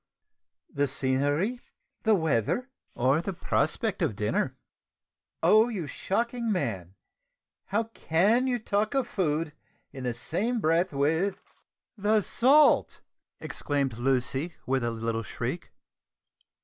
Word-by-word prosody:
said - - -60 0.6
Hector, 140 - -5
"the 145 - +4
scenery, 145 - 0 0.4
the 220 -1 +4
weather, 160 - 0 0.2
or 135 +6 +2
the 195 +2 -4
prospect - - -1
of - - 0
dinner?" - - -1 0.9
"Oh! 220 +3 +6
you 195 -8 -3
shocking 235 - -2
man, 95 - -2 0.7
how 210 +4 +1
can 220 +3 +1
you 250 -1 +1
talk 215 +1 -1
of 265 -3 +1
food 160 -7 -1 0.4
in 135 -2 -8
the 120 -1 -1
same 210 - -2
breath 170 +1 +2
with 160 +8 0 0.3
" - - -63
"The 210 +2 +3
salt!" 275 +9 +4 0.4
exclaimed 140 -5 -2
Lucy 135 +5 0
with 130 -1 0
a 120 - +1
little 115 0 -2
shriek. - - -5
165 Hz, 125 wpm, -28 LUFS, 135-220 Hz, 0.9 s, Oh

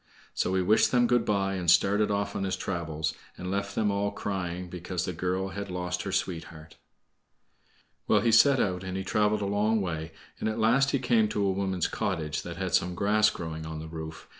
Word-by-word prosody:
So 95 - 0
he 95 - +2
wished 105 +4 +4
them 120 -1 +4
good 120 -1 +2
by 100 -2 +1
and 90 -3 -1
started 105 +4 +4
off 100 0 -1
on - - -2
his 95 -1 -1
travels, 80 -4 -3 0.2
and 90 +1 -5
left 100 0 -2
them 105 -2 +1
all 100 0 0
crying 90 -3 -4
because 90 0 -4
the 90 - -3
girl 90 +3 -2
had 100 0 -6
lost 90 0 -3
her 95 - -4
sweetheart. 80 -4 -4 1.3
Well, 105 - +4
he 115 +1 +2
set 135 +4 +6
out, 90 -1 0
and 95 0 -4
he 95 - -3
traveled 105 +2 +1
a - - -1
long 105 +2 +1
way, 80 -4 -3 0.3
and - - -1
at 110 - -3
last 120 +5 +3
he 140 - +2
came 120 -4 +2
to 100 - 0
a 95 - +2
woman's 95 -2 -1
cottage 75 -2 -2
that 85 -1 -7
had 95 -1 -3
some 90 0 +2
grass 105 +3 +3
growing 80 -1 -6
on 80 0 -6
the 80 +1 -7
roof. 80 0 -8
95 Hz, 215 wpm, -28 LUFS, 85-105 Hz, 1.3 s, set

